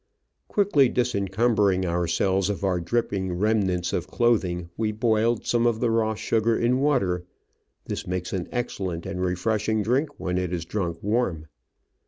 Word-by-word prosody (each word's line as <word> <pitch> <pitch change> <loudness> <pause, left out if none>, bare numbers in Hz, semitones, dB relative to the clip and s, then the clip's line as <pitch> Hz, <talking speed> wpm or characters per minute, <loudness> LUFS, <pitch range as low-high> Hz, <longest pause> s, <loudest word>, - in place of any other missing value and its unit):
Quickly 170 -11 +3
disencumbering 100 -4 +1
ourselves 90 +3 +1
of 100 -1 -3
our 95 -2 +1
dripping 95 -1 -1
remnants 95 -4 +1
of - - -1
clothing, 90 -8 0
we 110 -1 0
boiled 110 +1 +1
some 120 0 +2
of 115 -2 +1
the 120 -1 +1
raw 110 -1 +1
sugar 115 +1 +1
in 125 +2 +2
water 100 -12 +1 0.3
— - - -48
this - - -5
makes 90 0 -3
an 90 -3 -2
excellent 95 -8 -3
and 95 -1 -4
refreshing 105 +4 0
drink 135 +7 0
when 90 0 -1
it 90 -2 -2
is 85 -2 -3
drunk 85 -3 -2
warm. 100 -7 0
105 Hz, 155 wpm, -25 LUFS, 90-115 Hz, 0.3 s, Quickly